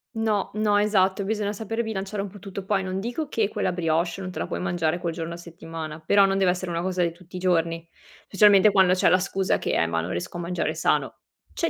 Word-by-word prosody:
No, 220 Hz, -3 st, 0 dB
no, 210 Hz, -1 st, +2 dB
esatto. 200 Hz, -2 st, +2 dB
Bisogna 210 Hz, 0 st, -1 dB
saper 225 Hz, +2 st, -3 dB
bilanciare 200 Hz, -2 st, -3 dB
un 200 Hz, -, -6 dB
po' 205 Hz, +2 st, -13 dB
tutto. 195 Hz, 0 st, -7 dB
Poi 200 Hz, -1 st, +1 dB
non 185 Hz, 0 st, -3 dB
dico 245 Hz, +9 st, -3 dB
che 225 Hz, -6 st, 0 dB
quella 185 Hz, -, -1 dB
brioche 170 Hz, +1 st, -1 dB
non 185 Hz, -1 st, -5 dB
te -, -, -6 dB
la -, -, -2 dB
puoi -, -, -4 dB
mangiare 175 Hz, -2 st, -1 dB
quel 170 Hz, -1 st, -3 dB
giorno 165 Hz, 0 st, -5 dB
a -, -, -7 dB
settimana, 165 Hz, -2 st, -8 dB
però 200 Hz, +5 st, +5 dB
non 195 Hz, 0 st, +1 dB
deve 190 Hz, -2 st, +4 dB
essere 180 Hz, 0 st, -4 dB
una 170 Hz, 0 st, -1 dB
cosa 185 Hz, 0 st, 0 dB
di 170 Hz, -, 0 dB
tutti 180 Hz, +2 st, -15 dB
i -, -, -3 dB
giorni. 165 Hz, -2 st, 0 dB, 0.4 s
Specialmente 205 Hz, 0 st, +5 dB
quando 190 Hz, -2 st, +5 dB
c'è 185 Hz, -, +3 dB
la 180 Hz, +2 st, +4 dB
scusa 190 Hz, 0 st, 0 dB
che: -, -, -2 dB
"Eh, 80 Hz, -, +2 dB
ma 85 Hz, 0 st, -1 dB
non 85 Hz, -, -5 dB
riesco 175 Hz, 0 st, -4 dB
a -, -, -5 dB
mangiare 175 Hz, 0 st, -2 dB
sano". -, -, 0 dB, 0.4 s
C'è 335 Hz, -, -1 dB
185 Hz, 245 wpm, -25 LUFS, 170-205 Hz, 0.4 s, però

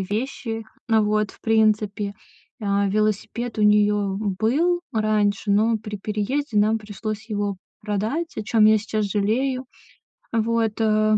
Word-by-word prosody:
вещи. 225 Hz, +3 st, -3 dB, 0.2 s
Вот, 215 Hz, -2 st, +2 dB
в -, -, -21 dB
принципе. 215 Hz, -2 st, +1 dB, 0.5 s
А, 200 Hz, -1 st, +1 dB
велосипед 215 Hz, +3 st, -1 dB
у -, -, +2 dB
неё 210 Hz, -1 st, +3 dB
был 225 Hz, -, +1 dB
раньше, 215 Hz, -2 st, +1 dB
но 220 Hz, +3 st, +3 dB
при 210 Hz, -1 st, -6 dB
переезде 215 Hz, +5 st, -2 dB
нам 215 Hz, +2 st, +3 dB
пришлось 215 Hz, +1 st, -6 dB
его 205 Hz, -2 st, -2 dB, 0.2 s
продать, 215 Hz, +11 st, -2 dB
о -, -, -2 dB
чём 220 Hz, -1 st, +4 dB
я 215 Hz, 0 st, +6 dB
сейчас 210 Hz, 0 st, -2 dB
жалею. 255 Hz, +7 st, 0 dB, 0.7 s
Вот, 225 Hz, -1 st, 0 dB
а, 215 Hz, 0 st, +3 dB
215 Hz, 130 wpm, -23 LUFS, 205-225 Hz, 0.7 s, я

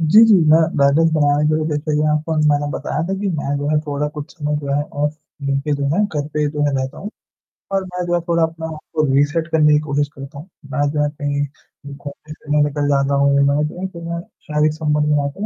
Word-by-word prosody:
जी, 185 Hz, +8 st, +7 dB
जी। 225 Hz, -2 st, +6 dB, 0.2 s
मैं 160 Hz, +1 st, +7 dB, 0.2 s
बैलेंस 145 Hz, +3 st, +4 dB
बनाने 145 Hz, -1 st, +2 dB
के 155 Hz, -, +2 dB
लिए -, -, +1 dB
तो -, -, -2 dB
देखिए 150 Hz, 0 st, 0 dB
आपको 155 Hz, +2 st, -1 dB, 0.2 s
मैंने 145 Hz, 0 st, +1 dB
बताया 150 Hz, -, -3 dB
था 195 Hz, -, 0 dB
कि 200 Hz, 0 st, -1 dB
मैं 145 Hz, 0 st, -1 dB
जो 145 Hz, +1 st, -2 dB
है 155 Hz, 0 st, +2 dB
थोड़ा 150 Hz, -1 st, -2 dB
कुछ 150 Hz, -1 st, -6 dB
समय 150 Hz, -1 st, -1 dB
जो 140 Hz, -1 st, -3 dB
है 145 Hz, -, +1 dB
ऑफ़ 145 Hz, +1 st, -3 dB, 0.3 s
लेके 140 Hz, +2 st, -1 dB
जो 140 Hz, 0 st, -2 dB
है 210 Hz, +4 st, +2 dB
घर 150 Hz, -7 st, -3 dB
पे 150 Hz, 0 st, +1 dB
जो 150 Hz, 0 st, -2 dB
है 145 Hz, -, 0 dB
रहता 130 Hz, +1 st, -3 dB
हूँ। 205 Hz, -, -6 dB, 0.6 s
और 195 Hz, -1 st, +1 dB
मैं 180 Hz, -1 st, -4 dB
जो 175 Hz, -, 0 dB
है -, -, +2 dB
थोड़ा 170 Hz, -1 st, +2 dB
अपने 160 Hz, 0 st, -3 dB
आप 160 Hz, -1 st, -6 dB, 0.2 s
को 155 Hz, -, +2 dB
रीसेट 145 Hz, +4 st, +2 dB
करने 150 Hz, -2 st, +4 dB
की 150 Hz, -, +4 dB
कोशिश 145 Hz, -1 st, -1 dB
करता 135 Hz, +1 st, -9 dB
हूँ। 155 Hz, -, -11 dB, 0.2 s
मैं 145 Hz, -1 st, +1 dB
जो 150 Hz, 0 st, 0 dB
है 145 Hz, -, +1 dB
कहीं 145 Hz, -1 st, -2 dB, 0.5 s
घूमने 145 Hz, +2 st, -10 dB
के 150 Hz, -1 st, -10 dB
लिए 150 Hz, 0 st, +4 dB
निकल 145 Hz, 0 st, -1 dB
जाता 140 Hz, 0 st, +2 dB
हूँ, 140 Hz, 0 st, +3 dB
मैं 140 Hz, +2 st, +2 dB
जो -, -, -9 dB
हूँ 180 Hz, -, -7 dB
ना -, -, -1 dB
फिर 170 Hz, -, -9 dB
मैं 170 Hz, 0 st, -3 dB, 0.3 s
शारीरि 150 Hz, 0 st, +2 dB
संबंध 150 Hz, -1 st, 0 dB
बनाता 145 Hz, +8 st, -2 dB
150 Hz, 250 wpm, -19 LUFS, 145-160 Hz, 0.6 s, जी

